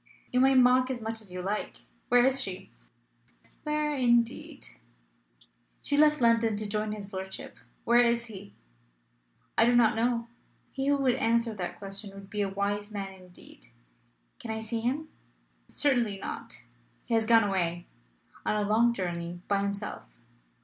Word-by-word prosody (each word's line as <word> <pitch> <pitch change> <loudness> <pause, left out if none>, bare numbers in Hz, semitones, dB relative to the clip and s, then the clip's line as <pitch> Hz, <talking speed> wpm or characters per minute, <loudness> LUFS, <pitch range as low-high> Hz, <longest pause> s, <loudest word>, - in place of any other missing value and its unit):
"You 250 - +2
may 265 +1 +5
mock 255 0 +5
as 255 -2 -2
much 225 0 -4
as 200 -4 -5
you 180 0 -5
like. 205 +3 -4 0.3
Where 245 -1 +5
is 270 +1 +4
she?" 185 -1 -5 0.9
"Where, 300 0 -1
indeed?" 240 -3 +1 1.2
"She 285 - 0
left 300 +1 +5
London 230 -2 +3
to 210 +1 -1
join 210 +1 -2
his 205 -1 -7
lordship. 190 0 -7 0.2
Where 240 +1 +5
is 235 0 +3
he? 205 -3 -11 1.0
"I 225 - +7
do 240 +1 +3
not 230 -3 +4
know. 235 +1 0 0.5
He 270 0 -3
who 285 0 +3
would 265 -3 +2
answer 230 0 +1
that 185 -4 -5
question 195 0 -7
would 195 0 -12
be 210 - -2
a 200 - 0
wise 205 +1 -2
man 200 -2 -5
indeed." 180 - -15 0.7
"Can 230 - -8
I 220 0 -3
see 220 +1 -3
him?" 275 +7 -2 0.6
"Certainly 245 -8 +1
not. 120 -9 -7 0.4
He - - -3
has 225 -1 +2
gone 225 -1 +6
away. 175 -3 -1 0.6
On - - 0
a 210 -1 0
long 235 +3 +3
journey. 175 -2 -4
By 200 -1 +1
himself." 200 - -5
220 Hz, 160 wpm, -28 LUFS, 200-240 Hz, 1.2 s, I